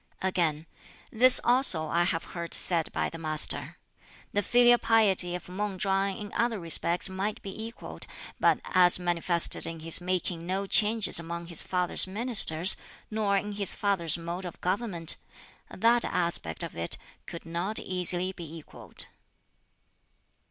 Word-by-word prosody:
'" - - -31
Again, 160 -4 -3 0.5
"This 250 +3 +6
also 240 -10 +4
I 170 +2 -1
have 165 -2 -3
heard 170 -1 0
said 170 -3 -1
by - - -3
the 165 - -10
Master: 155 -1 +1 0.6
'The 205 - -1
filial 240 +3 +2
piety 195 -6 +2
of 180 - -10
Mang 195 +1 -6
Chwang 195 +1 -2
in 205 -1 -11
other 235 -2 -2
respects 170 +1 0
might 195 +3 -6
be 200 +3 -8
equalled, 230 +1 -9 0.3
but - - +1
as 180 -1 +4
manifested 175 -1 +3
in 165 -1 -8
his 165 +2 -2
making 175 -2 -5
no 190 +2 -4
changes 210 -2 +3
among 170 +1 -8
his 170 - +4
father's 180 0 +1
ministers, 195 -5 +4 0.4
nor 210 -2 -2
in 205 +1 -5
his 200 -1 +2
father's 185 -5 -1
mode 170 +2 -8
of 180 - -10
government 180 -4 +3 0.5
that 235 +1 0
aspect 170 - -2
of - - -9
it 85 0 -2 0.3
could 170 - -10
not 175 +6 -5
easily 180 0 +1
be 165 -3 -12
equalled.'" 155 - -7
180 Hz, 150 wpm, -26 LUFS, 170-205 Hz, 0.6 s, This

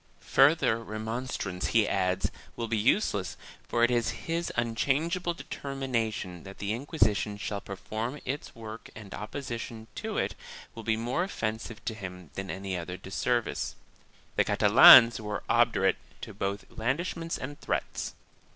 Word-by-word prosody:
Further 135 -5 +5
remonstrance, 110 -3 -3
he 115 -2 +3
adds, 90 -1 +1 0.2
will 115 - -3
be 115 - 0
useless 105 - +1 0.3
for 120 - +1
it 120 - +5
is 120 -2 +2 0.2
his 165 +1 -1
unchangeable 150 +10 0
de - - -9
termination 115 -10 -3
that 95 +2 -11
the 100 +1 -2
Inquisition 110 - +1
shall 100 0 -3
perform 110 +7 -5
its 140 +3 -4
work 110 0 -8
and 105 -3 -10
oppo 105 +8 -6
sition 115 -2 -5
to - - -4
it - - 0 0.4
will 115 - -7
be 110 0 0
more 120 +9 0
offensive 110 - -4
to 115 - -1
him 90 -6 -8
than 95 0 -5
any 95 0 -3
other 90 +1 -4
disservice.4 120 +5 -1 0.6
The - - +5
Catalans 120 -2 +9
were 105 -1 -4
obdurate - - +3 0.2
to - - -7
both 100 0 -3
blandishments 165 +8 -2
and 145 +3 -7
threats. - - -2
115 Hz, 145 wpm, -29 LUFS, 100-130 Hz, 0.6 s, Catalans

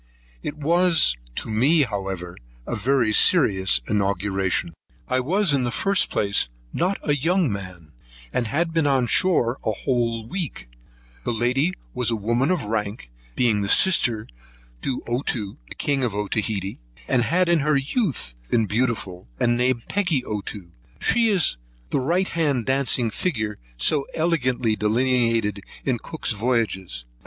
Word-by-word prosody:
It 145 - -5
was 165 - +4 0.2
to - - -1
me, 135 +9 +4
however, 95 -6 -4 0.3
a - - -3
very 120 0 +1
serious 95 - +4
inauguration: 95 -3 0 0.3
I 130 - +1
was, 180 +6 +1
in 135 -2 +2
the 120 - 0
first 195 +9 +1
place, 100 -10 +2 0.2
not 185 +3 0
a 145 - +3
young 165 - +1
man, 90 -5 -8 0.4
and 120 - 0
had 165 +7 -1
been 165 -3 +2
on 135 -3 +2
shore 130 -4 +2
a - - 0
whole 115 0 -1
week; 165 - -4 0.5
the - - -1
lady 125 +9 +1 0.2
was 125 -2 0
a 115 - +1
woman 115 +6 0
of 180 -3 0
rank, 105 - -3 0.2
being 105 -5 +2
sister 115 - +3 0.6
to 130 - -3
Ottoo, 120 -4 -2
the - - -9
king 140 -2 0
of 115 -5 -1
Otaheitee, 105 -1 -2 0.3
and 125 - +2
had 180 +5 +2
in 170 -1 +3
her 150 0 +2
youth 140 - -1 0.2
been 115 -2 +2
beautiful, 105 - -2
and 120 0 +2
named 125 -1 +1
Peggy 175 -10 0
Ottoo. 100 -4 -6 0.3
She 230 -1 +3
is 185 - +2 0.3
the - - +1
right 175 +8 0
hand 145 -8 0
dancing 130 -3 +1
figure 110 - -2 0.2
so 140 - +2
elegantly 130 -9 +1
delineated 115 -2 +1 0.2
in 125 -4 0
Cook's 160 +2 -4
Voyages. 105 - -1
120 Hz, 145 wpm, -23 LUFS, 105-150 Hz, 0.6 s, was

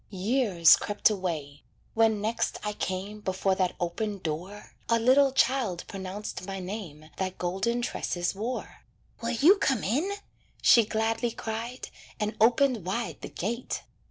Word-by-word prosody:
Years 195 - +4
crept 205 +1 +2
away. 160 -8 -4 0.3
When 220 -2 +3
next 220 +2 -1
I 210 0 -2
came 200 +2 -4
Before 190 0 0
that 185 -1 0
open 200 +4 -2
door, 180 +4 -6 0.2
A 230 - +4
little 265 +4 +5
child 245 -9 +1
pronounced 195 0 -6
my 195 0 -4
name 180 -6 -7
That 185 -1 -3
golden 195 +7 -1
tresses 175 -6 -2
wore. 225 +6 -5 0.4
"Will 230 - -2
you 290 - +5
come 265 - +1
in?" 290 - 0 0.5
she 230 -2 +6
gladly 225 +2 0
cried, 230 +3 -5 0.3
And 210 +1 -1
opened 240 -1 +4
wide 200 +7 -3
the - - -6
gate. 235 +7 -3
210 Hz, 140 wpm, -28 LUFS, 185-235 Hz, 0.5 s, she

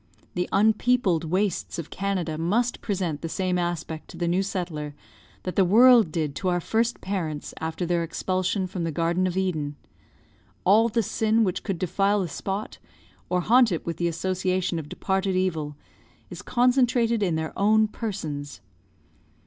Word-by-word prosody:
The 180 0 -2
unpeopled 215 -4 +2
wastes 185 +3 -1
of 165 -2 -6
Canada 185 -5 -2
must 210 +10 0
present 180 -7 -2
the 165 - -4
same 180 +1 0
aspect 170 -2 -3
to - - -11
the 170 0 -1
new 175 +3 +2
settler 170 -7 -4 0.5
that 185 - -4
the 195 - +5
world 225 0 +6
did 155 -3 -1
to 185 - -3
our 175 -1 +2
first 230 +6 0
parents 165 -7 -3
after 160 +2 -3
their 170 0 +1
expulsion 185 +3 -1
from 180 -1 -4
the 165 - -1
Garden 170 +4 +1
of 180 0 -3
Eden; 155 -6 -1 0.9
all 220 +5 +5
the 230 +1 +1
sin 220 +3 +2
which 185 -4 -1
could 195 -4 -3
defile 195 +4 +1
the 175 - -4
spot, 195 +7 -4 0.5
or 180 0 +1
haunt 240 +3 +5
it 170 - -2
with 170 -2 -3
the 175 - 0
association 185 +1 -1
of 150 -2 -8
departed 190 +2 -1
evil, 160 -6 -1 0.6
is - - -7
concentrated 245 -2 +2
in 180 -5 +1
their 160 0 -3
own 215 +2 +4
persons. 155 - -5
185 Hz, 165 wpm, -25 LUFS, 165-205 Hz, 0.9 s, world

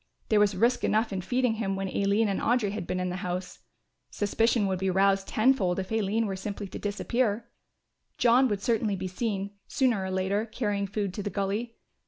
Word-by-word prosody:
There 215 - +4
was 205 -1 +3
risk 240 +5 +2
enough 220 0 +1
in 190 - -2
feeding 245 +4 +1
him 195 -2 -1
when 195 0 -2
Aline 200 +3 +1
and 195 - -1
Audry 230 -4 +2
had 205 -4 -5
been 185 - -1
in 180 0 -1
the 180 - -3
house. 180 0 -4 0.5
Suspicion 225 +2 +1
would 190 -2 -1
be 190 0 0
roused 195 +1 +2
tenfold 215 -6 +2
if 190 +1 -4
Aline 220 +1 +1
were 195 -2 -2
simply 200 +1 -5
to - - -7
disappear. 220 +2 -1 0.7
John 250 +2 +5
would 205 -4 -2
certainly 220 -3 +1
be 190 0 -4
seen, 200 0 -3 0.2
sooner 245 -7 +1
or 190 - -3
later, 190 +4 0
carrying 205 -3 -2
food 200 -2 -2
to 205 - -4
the 205 - -3
gully. 205 +4 -2
205 Hz, 200 wpm, -28 LUFS, 190-225 Hz, 0.7 s, John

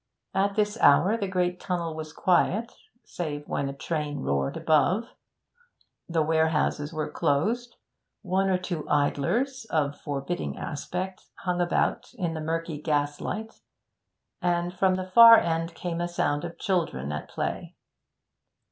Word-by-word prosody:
At 200 +1 +1
this 210 +1 0
hour 175 +9 +6
the 205 -4 -2
great 180 -1 0
tunnel 170 -3 -2
was 155 -1 -6
quiet, 185 +7 +1 0.3
save 150 -4 -5
when 140 - -1
a - - -5
train 150 -1 -3
roared 70 - -1
above; 175 - +2 1.0
the 165 -2 +2
warehouses 160 -1 +1
were 155 -2 -2
closed; 230 +12 0 0.5
one 190 0 +1
or 185 - +3
two 175 -4 -5
idlers, 205 - 0
of 145 -5 -1
forbidding 145 +5 -3
aspect, 180 +5 -5 0.2
hung 180 -1 0
about 175 +7 0
in 175 -7 -2
the 160 - -4
murky 160 -1 -3
gaslight, 150 +9 -2 0.8
and 175 0 0
from 185 0 +2
the 185 0 -3
far 230 +4 +9
end 165 -1 -1
came 170 -1 -3
a 175 - 0
sound 175 -4 -1
of 170 - -7
children 165 - -1
at 75 +1 -5
play. - - -4
170 Hz, 140 wpm, -27 LUFS, 150-190 Hz, 1.0 s, far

